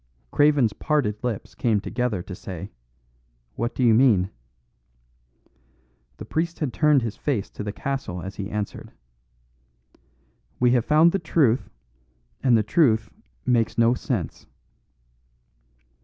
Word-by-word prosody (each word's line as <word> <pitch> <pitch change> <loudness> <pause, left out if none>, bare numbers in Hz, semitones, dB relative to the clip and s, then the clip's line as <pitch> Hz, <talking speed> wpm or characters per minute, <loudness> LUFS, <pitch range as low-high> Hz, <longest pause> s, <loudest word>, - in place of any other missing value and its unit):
Craven's 145 -7 +3
parted 130 -9 -1
lips 120 -5 -4
came 110 -4 +1
together 115 -3 -2
to 95 - -8
say, 95 +1 -8 0.8
"What 120 +2 -3
do 130 - 0
you 115 -2 +5
mean?" 110 -6 +4 1.9
The - - -8
priest 165 +1 -2
had 145 -6 -2
turned 150 -4 +3
his 115 -2 -3
face 120 -9 -2
to - - -6
the 105 - -3
castle 135 -7 -4
as 95 +2 -7
he 100 0 -4
answered: 105 -1 -5 1.7
"We 125 -1 +4
have 120 -2 +2
found 155 +3 +5
the 195 - 0
truth; 145 -7 +1 0.7
and 125 -4 +4
the 110 - +2
truth 110 - +2 0.3
makes 115 -3 +1
no 115 +1 +4
sense." 120 - -4
120 Hz, 125 wpm, -24 LUFS, 105-140 Hz, 1.9 s, you